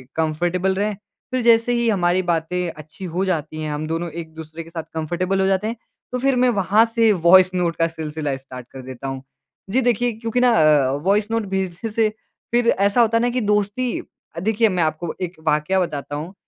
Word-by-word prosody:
Comfortable 175 +4 0
रहे। 205 +2 0 0.4
फ़िर 255 - 0
जैसे 235 0 +4
ही 235 -1 +1
हमारी 185 -3 +2
बातें 175 +1 -1
अच्छी 155 +5 -11
हो 185 +2 0
जाती 155 -4 -2
हैं, 155 -1 -3
हम 150 +1 -3
दोनों 165 +1 -2
एक-दूसरे 160 0 -8
के 165 - -14
साथ 165 -1 -5
कंफ़र्टेबल 175 +4 -1
हो - - +2
जाते 195 +2 +1
हैं 230 - -3 0.4
तो 250 - -2
फ़िर 270 +1 +2
मैं 250 0 +3
वहाँ 200 +4 +4
से 230 -1 +3 0.2
वॉइस 185 0 +8
नोट 170 -2 0
का 165 0 +2
सिलसिला 155 -3 -4
स्टार्ट 130 -2 -11
कर 135 - -9
देता 130 +1 -8
हूँ। 135 0 -5 0.5
जी 255 +7 +2
देखिए 245 0 +1
क्योंकि 225 +2 -2
ना 250 0 +5
अ, 150 - +4
वॉइस 205 +2 +2
नोट 225 -1 0
भेजने 190 +3 -3
से 220 0 +2 0.4
फ़िर 240 0 +2
ऐसा 200 +5 +3
होता 230 0 +3
है 230 - +1
ना 245 - +2
कि 250 +1 -1
दोस्ती 210 +4 0 0.4
देखिए 220 +3 +2
मैं 180 -3 +1
आपको 155 +1 -2
एक 180 0 -3
वाक़या 150 +5 +2
बताता 145 -5 -3
हूँ 160 +6 -6
185 Hz, 205 wpm, -21 LUFS, 160-225 Hz, 0.5 s, वॉइस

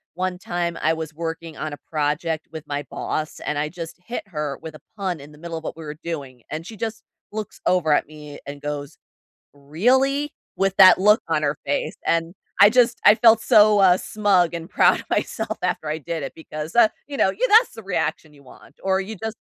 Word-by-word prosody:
one 185 0 -2
time 175 -2 -3
I 160 +1 +2
was 160 -1 -5
working 165 0 -6
on 155 -1 -4
a - - -7
project 155 +2 -2
with 160 -1 -8
my 145 0 -3
boss, 155 0 -4
and 150 - -3
I 150 - -1
just 170 0 -8
hit 235 +3 -5
her 150 -4 -3
with 160 -1 -7
a - - -13 0.2
pun 185 -5 -2
in 145 +2 -12
the 150 - -16
middle 170 +1 -6
of 160 - -8
what 165 - -6
we 165 - -8
were 150 - -5
doing, 140 -7 -6
and 160 +2 -5
she 225 - -9
just 220 +1 -5 0.3
looks 215 -1 -6
over 165 -5 +3
at - - +1
me 150 -1 -11
and 145 0 -7
goes, 145 0 -5 0.6
"Really?" 260 - +1 0.2
With 195 0 0
that 185 -1 +8
look 210 +3 +5
on 160 -2 +1
her 145 0 0
face. 145 - -1
And 165 +2 0 0.2
I 200 - +9
just 235 0 +3
I 210 - +9
felt 225 0 +5
so, 210 -2 +5
uh, 185 -2 +6
smug 190 -5 +1
and 170 -1 -6
proud - - +4
of - - -10
myself - - -2
after 155 - -1
I 155 - -1
did 160 0 -5
it - - -6
because, 155 0 -7
uh, 235 -2 +6 0.2
you 285 - -6
know, 190 - +3
you - - 0
that's 455 +2 +5
the 225 - -8
reaction 160 -5 -2
you 140 -1 -19
want 135 +2 -17
or 190 0 +2
you 215 +3 -7
just 220 +3 -6
165 Hz, 220 wpm, -22 LUFS, 150-205 Hz, 0.6 s, I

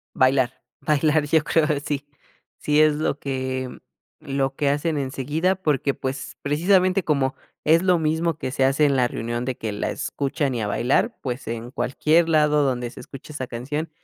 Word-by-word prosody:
Bailar, 130 -1 +3 0.3
bailar 150 0 +2
yo 160 +1 +3
creo 155 0 +2 0.2
sí. 145 -1 -3 0.5
Sí 150 +1 +2
es 155 -1 +4
lo 150 -1 -1
que 130 -2 -3 0.4
lo 135 -1 -2
que 145 0 +1
hacen 150 +2 0
enseguida 145 +7 0
porque, 145 -6 0
pues, 135 0 -5
precisamente 185 +5 +3
como 140 -4 +1 0.3
es 160 +2 +4
lo 180 -1 +3
mismo 160 0 0
que 130 - -4
se 135 - 0
hace 135 +3 +3
en 140 -1 +3
la 125 -2 +3
reunión 120 +1 -3
de 130 -1 -2
que 110 - -3
la 105 - -2
escuchan 140 -1 -2
y 120 - -2
a 105 - -1
bailar, 120 +6 +1
pues, 125 -2 -4
en 115 +1 -5
cualquier 155 +5 +2
lado 150 -2 +4
donde 125 -3 -1
se - - -12
escucha 135 +3 -10
esa 130 -3 -4
canción 140 +7 -4
140 Hz, 180 wpm, -23 LUFS, 130-155 Hz, 0.5 s, es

